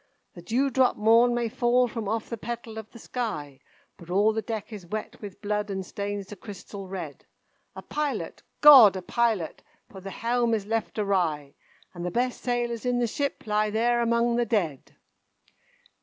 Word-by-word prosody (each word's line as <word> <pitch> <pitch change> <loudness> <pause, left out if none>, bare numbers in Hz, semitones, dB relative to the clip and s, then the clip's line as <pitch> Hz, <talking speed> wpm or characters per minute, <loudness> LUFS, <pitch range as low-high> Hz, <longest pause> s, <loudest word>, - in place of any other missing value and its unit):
"The 175 - -11
dewdrop 255 +5 +2
morn 230 +3 +5
may 240 -1 0
fall 245 +2 +2
from 225 -2 -5
off 225 0 -2
the 235 - -4
petal 230 0 -6
of 220 - -10
the - - -13
sky, 195 - -5 0.4
But 170 - -14
all 205 +4 +3
the 220 - -1
deck 220 -1 -5
is 195 -5 -9
wet 215 +4 -6
with 205 0 -10
blood 210 0 -1
and 190 -1 -3
stains 200 +1 -4
the 205 - -10
crystal 195 0 -9
red. 175 -7 -7 0.5
A - - -8
pilot, 295 -1 -3 0.2
GOD, 265 -10 +10
a 185 - -5
pilot! 220 -5 0 0.3
for 190 - -10
the 195 - -7
helm 235 +3 0
is 205 -3 -4
left 225 +1 -2
awry, 170 -9 0 0.4
And 175 -1 -7
the 180 - -1
best 245 +6 -1
sailors 240 -2 -1
in 250 -1 0
the 245 - +2
ship 280 +5 -3
lie 215 0 +1
there 235 +3 +1
among 235 0 +2
the 240 - +2
dead!" 175 - -2
220 Hz, 180 wpm, -26 LUFS, 195-240 Hz, 0.5 s, GOD